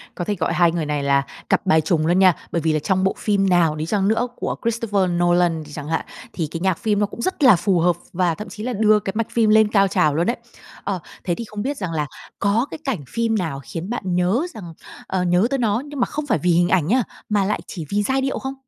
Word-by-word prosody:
có 175 - -4
thể 205 - -1
gọi - - -1
hai 175 -2 +4
người 165 -2 -2
này 150 -1 -2
là 140 0 +3 0.3
cặp - - +2
bài 160 -4 +4
trùng 155 0 +1
luôn 175 +3 +3
nha. 185 -2 +6 0.2
Bởi 170 - 0
vì 160 0 +1
là 155 - +1
trong 190 +4 0
bộ 190 - +2
phim 195 -2 +1
nào 170 -4 +3
đi 155 +1 -3
chăng 195 +2 0
nữa 225 +3 +1
của - - -3
Christopher 220 -5 0
Nolan 175 -2 +2
đi 150 - -13
chẳng 145 0 -7
hạn, 160 0 -1 0.3
thì 165 -4 -2
cái 165 - -4
nhạc 185 -1 +1
phim 210 -3 0
nó 205 - +3
cũng 205 - -8
rất 315 +1 -1
là 250 -6 +8
phù 180 +1 +1
hợp, 175 +1 +3 0.2
và 175 -2 +1
thậm 210 - -8
chí 210 - -8
là 250 +1 -2
đưa 215 0 +4
cái 195 -1 -4
mạch 230 0 -1
phim 225 -2 +2
lên 220 0 +6
cao 200 -2 +3
trào 150 -4 +2
luôn 170 +3 +1
ấy. 240 - -1 0.5
Ờ, 195 -3 -2 0.2
thế 175 - -1
thì 235 - -6
không 210 -1 -6
biết 275 +5 -2
rằng 185 -4 -4
là 150 -2 -1 0.3
có 210 +5 +2
cái - - -5
cảnh 265 - -1
phim 230 -1 0
nào 160 -7 -3
khiến 165 - -6
bạn 190 -7 -2
nhớ 180 +8 +2
rằng 180 -8 -9 0.3
ờ, 190 -1 -1
nhớ 180 +4 +3
tới 275 - 0
nó 220 -2 +1
nhưng 290 -2 -7
mà - - +3
không 300 0 -4
phải 220 - +2
vì 180 - +1
hình 175 +1 +3
ảnh 170 -5 +2
nhá, 250 +4 +3 0.3
mà 205 -2 +2
lại 210 - 0
chỉ 165 -5 -6
vì 205 +1 +1
giai 265 +5 +1
điệu 270 0 -1
không? 265 0 -4
190 Hz, 275 wpm, -21 LUFS, 170-220 Hz, 0.5 s, là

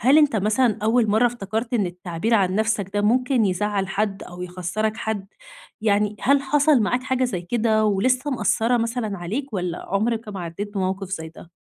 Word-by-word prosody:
هل 265 +7 +5
أنت، 295 -6 +4
مثلًا، 215 +2 +2
أوّل 225 0 +3
مرّة 220 +4 +4
افتكرت 230 +1 -3
إن 205 -5 +2
التعبير 180 +5 -2
عن 190 -3 +2
نفسك 210 -2 0
ده 205 - +2
ممكن 250 +2 +2
يزعّل 195 +1 -1
حد، 195 0 -2
أو 175 0 -9
يخسّرك 185 +5 -2
حد 215 -4 -3 0.5
يعني؟ 210 -1 +1
هل 280 +1 +3
حصل 285 -1 +3
معاك 245 +5 0
حاجة 260 0 0
زي 195 -8 -2
كده، 220 +2 +1
ولسّه 250 +8 +1
مأثرة، 225 0 +1
مثلًا، 230 -4 -2
عليك، 225 +10 -4
والّا 180 -3 -3
عمرك 220 +3 -1
ما 195 -3 -5
عدّيت 200 +5 -6
بموقف 190 0 -2
زي 160 -4 -4
ده؟ 165 +1 -14
215 Hz, 180 wpm, -23 LUFS, 190-240 Hz, 0.5 s, هل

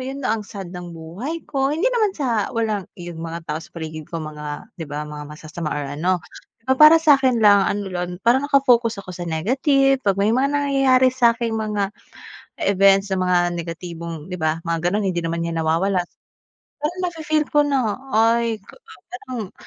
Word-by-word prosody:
yun 270 +2 -5
'no, 220 - +2
ang 225 - -1
sad 195 -3 -7
ng 175 -1 -8
buhay 210 - -6
ko. 270 -1 0
Hindi 320 +5 -1
naman 435 -5 +2
sa 235 -8 0
walang 215 -5 -1
yung 175 -2 -8
mga 165 0 -6
tao 150 - -1
sa - - -13
paligid 155 -2 -7
ko 170 - -5
mga, 150 -1 -7
di - - -3
ba, 145 +1 -4
mga 150 0 -8
masasama 155 +1 -6
or 145 - -2
ano. 175 +5 0 0.5
Pero 260 - +1
para 305 +2 +10
sa'kin 270 -6 +4
lang 205 -1 +7
ano 205 0 -2
lang, 180 0 -3
parang 260 +4 +3
naka-focus 240 -7 +3
ako - - -9
sa 175 0 -6
negative, 270 - +2
'pag 200 -2 +3
may 200 +2 +2
mga 260 +3 +2
nangyayari 270 -2 +3
sa 240 -2 +4
aking 235 -1 -2
mga 210 -2 -1 0.8
events 195 0 +4
na 190 - 0
mga 180 -1 +3 0.2
negatibong 170 -1 -6
di 180 - -4
ba, 160 0 0
mga 170 - 0
ganun 210 +2 0
hindi 175 -1 -1
naman 165 0 -2
'yan 165 0 -3
nawawala. 180 +5 +1 0.8
Pero 300 +3 -1
nafi-feel 310 -3 -1
ko 295 -1 +4
na 255 -7 0 0.2
ay 230 0 +2 0.5
parang, 245 -5 -6
205 Hz, 185 wpm, -21 LUFS, 170-260 Hz, 0.8 s, para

